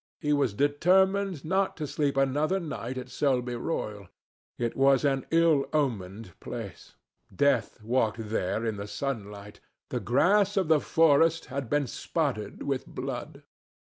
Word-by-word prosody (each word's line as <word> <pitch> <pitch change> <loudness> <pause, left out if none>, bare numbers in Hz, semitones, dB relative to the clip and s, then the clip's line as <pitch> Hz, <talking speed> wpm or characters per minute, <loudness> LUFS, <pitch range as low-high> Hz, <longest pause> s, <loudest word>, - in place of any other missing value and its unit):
He 150 -2 0
was 140 -8 +1
determined 185 - +2
not 190 +3 0
to 155 - -3
sleep 140 -1 -1
another 145 +7 +1
night 130 -7 -5
at 125 - -5
Selby 125 -3 0
Royal. 105 - -4 0.5
It 120 -1 -2
was 135 +1 +4
an 135 -2 0
ill 165 -4 +3
omened 110 -9 -2
place. - - -8 0.4
Death 125 +1 +1
walked 115 -2 0
there 110 +2 -1
in 110 -2 -2
the 100 +1 -6
sunlight. 105 -5 -5 0.3
The - - -2
grass 200 - +2
of 185 -5 +1
the 160 -2 +5
forest 165 +2 +3
had 135 -4 -3
been 145 -1 +1
spotted 125 -5 -3
with 135 -2 -2
blood. - - -6
140 Hz, 140 wpm, -28 LUFS, 115-160 Hz, 0.5 s, the